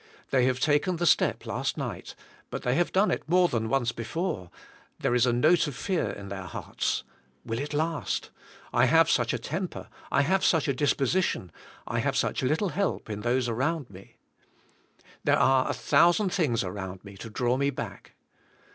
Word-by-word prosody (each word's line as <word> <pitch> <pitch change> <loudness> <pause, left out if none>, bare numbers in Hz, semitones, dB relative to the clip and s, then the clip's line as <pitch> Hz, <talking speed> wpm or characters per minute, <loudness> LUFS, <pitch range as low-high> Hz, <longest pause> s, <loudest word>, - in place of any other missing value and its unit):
They 130 -2 +4
have 130 0 +1
taken 150 +6 +2
the 175 +1 -1
step 160 - +3
last - - -2
night, - - -5 0.3
but - - -5
they 125 - +1
have 175 +5 +1
done 195 +3 +3
it - - -3
more 180 +1 +5
than 110 -6 -2
once 120 -2 +1
before, 115 - -3 0.5
there - - 0
is 125 0 +3
a - - +3
note 155 +8 +3
of 145 - -5
fear 180 +5 -1
in 100 -1 -7
their 95 -1 -6
hearts. 85 - -3 0.4
Will 115 0 -3
it 145 +1 -4
last? 160 +1 -2 0.4
I 120 - +5
have 165 +6 +5
such 120 -1 +2
a - - -1
temper, 170 - -5 0.2
I - - +3
have 190 +6 +1
such 160 -4 +3
a 140 - +2
disposition, 140 - 0 0.3
I - - -2
have - - 0
such - - 0
little 155 +10 +1
help 195 - -2
in 105 0 -4
those 120 +2 +1
around 130 +3 -1
me. 95 0 -14 1.1
There - - +3
are 130 -1 +3
a - - +1
thousand 175 +4 +3
things 155 - +1
around 95 0 -6
me 100 0 -10
to 115 - -8
draw 120 +3 0
me 140 +1 +1
back. 135 - -7
130 Hz, 185 wpm, -27 LUFS, 115-165 Hz, 1.1 s, more